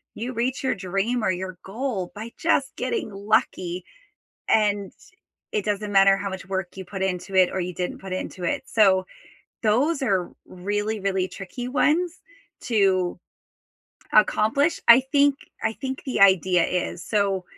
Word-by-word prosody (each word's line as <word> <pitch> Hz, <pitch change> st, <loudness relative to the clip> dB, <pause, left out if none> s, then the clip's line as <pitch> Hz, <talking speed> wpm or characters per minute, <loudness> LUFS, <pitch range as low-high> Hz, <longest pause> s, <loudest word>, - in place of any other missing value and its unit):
you 245 Hz, +4 st, -4 dB
reach 250 Hz, +3 st, -2 dB
your 260 Hz, -, +1 dB
dream 195 Hz, +5 st, -1 dB
or 190 Hz, -, +2 dB
your 185 Hz, 0 st, -5 dB
goal 205 Hz, -3 st, -3 dB
by 220 Hz, +3 st, -7 dB
just 280 Hz, -5 st, +1 dB
getting 450 Hz, -, -2 dB
lucky, 195 Hz, -3 st, 0 dB, 0.7 s
and 205 Hz, -2 st, +2 dB, 0.6 s
it 210 Hz, -, -1 dB
doesn't 210 Hz, 0 st, -2 dB
matter 195 Hz, 0 st, +6 dB
how 200 Hz, 0 st, -3 dB
much 190 Hz, -1 st, -7 dB
work 190 Hz, -2 st, -2 dB
you 190 Hz, -, -6 dB
put 190 Hz, +1 st, -7 dB
into 190 Hz, 0 st, -3 dB
it 185 Hz, -1 st, +5 dB
or 190 Hz, -, -2 dB
you 180 Hz, 0 st, -3 dB
didn't 180 Hz, +1 st, -4 dB
put 190 Hz, -1 st, -6 dB
into 185 Hz, 0 st, -5 dB
it, -, -, -1 dB
so 190 Hz, -4 st, +4 dB, 0.6 s
those 270 Hz, +8 st, +2 dB
are 190 Hz, -8 st, 0 dB, 0.2 s
really, 205 Hz, +4 st, -3 dB
really 190 Hz, -1 st, 0 dB
tricky 195 Hz, +7 st, -7 dB
ones 330 Hz, +6 st, +1 dB, 0.4 s
to 190 Hz, -6 st, +1 dB, 0.9 s
accomplish, 225 Hz, +9 st, +3 dB
I 235 Hz, +3 st, +9 dB
think 285 Hz, -1 st, +4 dB, 0.3 s
I 220 Hz, 0 st, 0 dB
think 265 Hz, +1 st, -5 dB
the 260 Hz, -, -1 dB
idea 185 Hz, -2 st, +5 dB
is 180 Hz, -1 st, -2 dB
so, 200 Hz, -3 st, 0 dB
200 Hz, 155 wpm, -24 LUFS, 185-235 Hz, 0.9 s, I